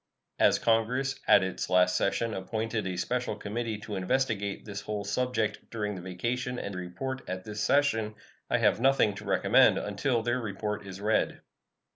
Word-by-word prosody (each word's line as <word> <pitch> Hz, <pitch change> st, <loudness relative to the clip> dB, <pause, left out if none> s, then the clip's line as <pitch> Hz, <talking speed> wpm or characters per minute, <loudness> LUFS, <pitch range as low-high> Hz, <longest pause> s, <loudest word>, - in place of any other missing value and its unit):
As -, -, +5 dB
Congress, 125 Hz, +4 st, +1 dB
at 100 Hz, -, +7 dB
its 95 Hz, -1 st, -3 dB
last 90 Hz, 0 st, +4 dB
session, 115 Hz, +3 st, 0 dB
appointed 110 Hz, +2 st, -2 dB
a 90 Hz, -1 st, -3 dB
special 120 Hz, +3 st, -1 dB
committee 110 Hz, +1 st, -3 dB
to 105 Hz, 0 st, -5 dB
investigate 100 Hz, 0 st, -1 dB
this 100 Hz, -1 st, -6 dB
whole 105 Hz, -1 st, -4 dB
subject 110 Hz, 0 st, -1 dB
during 105 Hz, -2 st, -3 dB
the 95 Hz, -, -7 dB
vacation 120 Hz, +8 st, -3 dB
and 100 Hz, -, -4 dB
report 115 Hz, +9 st, -4 dB
at 95 Hz, 0 st, -4 dB
this 105 Hz, -1 st, -5 dB
session, 115 Hz, -7 st, +2 dB, 0.3 s
I -, -, +3 dB
have -, -, +2 dB
nothing 135 Hz, -5 st, +4 dB
to -, -, -9 dB
recommend -, -, +4 dB
until 115 Hz, +3 st, -1 dB
their 120 Hz, +2 st, 0 dB
report 105 Hz, -1 st, -4 dB
is 95 Hz, 0 st, -8 dB
read. 105 Hz, +2 st, 0 dB
105 Hz, 165 wpm, -29 LUFS, 100-120 Hz, 0.3 s, at